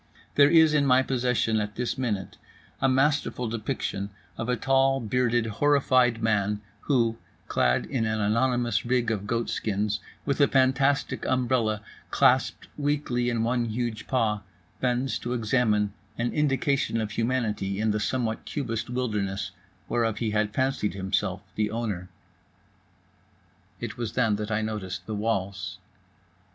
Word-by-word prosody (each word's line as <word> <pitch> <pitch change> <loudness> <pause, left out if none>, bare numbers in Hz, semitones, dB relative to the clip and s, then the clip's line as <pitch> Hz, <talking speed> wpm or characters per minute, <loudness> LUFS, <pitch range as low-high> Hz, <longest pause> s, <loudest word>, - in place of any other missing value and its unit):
There 140 0 +6
is 160 -1 +6
in 145 -2 +3
my 130 0 +5
possession 125 -4 +1
at 105 0 -3
this 125 0 -1
minute 105 -8 -3 0.4
a 135 - +4
masterful 135 -2 +1
depiction 110 -3 -3 0.3
of 115 - -4
a 125 - +3
tall, 135 +1 +3
bearded, 120 0 +1
horrified 125 -1 +3
man 105 -2 +1 0.2
who, 115 -5 +1 0.3
clad 60 0 +2
in 115 -4 -1
an 110 0 -1
anonymous 120 +3 +1
rig 120 -1 +1
of 105 -2 -3
goat 115 +1 0
skins, 105 0 -1 0.3
with 140 0 0
a 140 - +7
fantastic 135 +1 +2
umbrella 120 -4 +1 0.3
clasped - - +2
weakly 145 -4 0
in 115 -2 0
one 120 +1 +1
huge 115 -1 -3
paw, 110 -5 +1 0.4
bends 125 +1 0
to 120 - -3
examine 110 -3 +1 0.2
an 120 0 -1
indication 140 -4 +1
of 110 -1 -2
humanity 110 -4 -1
in 110 0 +2
the 105 - 0
somewhat 110 +1 -1
cubist 120 -7 -3
wilderness 105 -6 -2 0.4
whereof 115 -2 0
he 110 -3 -1
had 105 0 +1
fancied 130 -4 0
himself 95 0 -1
the 105 0 0
owner…. 105 -5 -3 1.7
It - - -5
was 115 -3 -3
then 105 -2 +2
that 105 0 -4
I 110 0 0
noticed 95 -4 -4
the 110 - -4
walls. 100 -3 -2
115 Hz, 140 wpm, -27 LUFS, 105-130 Hz, 1.7 s, a